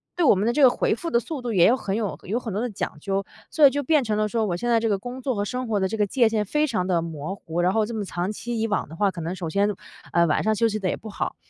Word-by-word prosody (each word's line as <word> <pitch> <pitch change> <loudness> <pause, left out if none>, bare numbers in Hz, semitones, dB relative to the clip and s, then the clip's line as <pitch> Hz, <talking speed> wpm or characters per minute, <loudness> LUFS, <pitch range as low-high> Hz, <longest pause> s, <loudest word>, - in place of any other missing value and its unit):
对 350 - +1
我 - - +7
们 200 +3 0
的 240 - +2
这 295 - +1
个 255 - +9
回 - - +1
复 335 +6 -5
的 235 - +4
速 285 +1 -6
度 240 - -2
也 175 -3 +6
有 245 - +5
很 195 -4 -3
有 215 -3 -2
有 220 +6 -2
很 225 -5 -6
多 210 - -1
的 245 - -1
讲 185 - -4
究， 195 +3 -1 0.3
所 305 -2 +5
以 - - +5
就 285 - -1
变 300 0 +3
成 215 -2 -1
了 215 0 +1
说 225 0 0
我 175 - -1
现 240 +5 -2
在 230 -1 +4
这 225 - 0
个 200 - +2
工 245 +5 -7
作 255 -2 -1
和 205 - -1
生 250 +2 -3
活 210 -2 0
的 190 - +1
界 220 +2 +2
限 215 -2 0
非 300 +8 +1
常 195 -8 -1
地 175 -3 +2
模 160 +3 -5
糊， 175 -2 -3
然 180 +2 +2
后 220 -1 +2
这 235 - -6
么 215 -2 -2
长 180 +2 -3
期 230 +1 -4
以 225 - +1
往 210 - -1
的 160 - -9
话， 200 +2 +2
可 170 -2 -7
能 170 +3 -3
首 170 -4 -4
先， 200 +4 +2 0.4
呃 170 0 +4
晚 150 - +1
上 220 - +2
的 - - +1
休 230 +2 +2
息 215 0 -2
得 190 - -2
也 - - -1
不 220 - -10
好。 - - -3
215 Hz, 365 characters per minute, -24 LUFS, 190-240 Hz, 0.4 s, 个